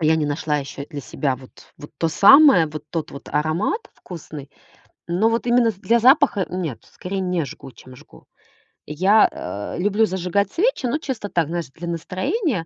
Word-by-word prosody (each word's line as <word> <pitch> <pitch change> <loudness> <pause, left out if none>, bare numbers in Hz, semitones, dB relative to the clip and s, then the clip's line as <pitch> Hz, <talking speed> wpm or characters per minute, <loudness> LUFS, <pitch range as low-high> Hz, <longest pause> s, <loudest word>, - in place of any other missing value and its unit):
я 160 0 +3
не 155 -2 -1
нашла 150 +1 -1
ещё 140 0 -7
для 145 -3 -6
себя 135 0 -2
вот, 130 0 -15 0.3
вот 145 - -11
то 165 - +1
самое, 235 - +7
вот 150 -1 -8
тот 165 -3 -4
вот 140 - -11
аромат 160 - 0
вкусный, 150 -5 -10 0.6
но 180 +6 +2
вот 230 +1 -2
именно 240 -1 +3
с - - -16
для 225 +5 +1
запаха- 260 - +4
нет, 165 -11 -5
скорее 190 +2 -5
не 180 -4 -1
жгу, 135 0 -11
чем 130 0 -15
жгу. - - -18 0.6
Я, 190 +8 +4
э, 100 +3 -6
люблю 205 +4 +2
зажигать 190 +1 -1
свечи, 430 - 0
но 255 - 0
чисто 265 -9 -5
так, 170 -5 0
знаешь, 170 -2 -4
для 170 +4 -8
настроения. 185 - -2
175 Hz, 180 wpm, -21 LUFS, 150-220 Hz, 0.6 s, самое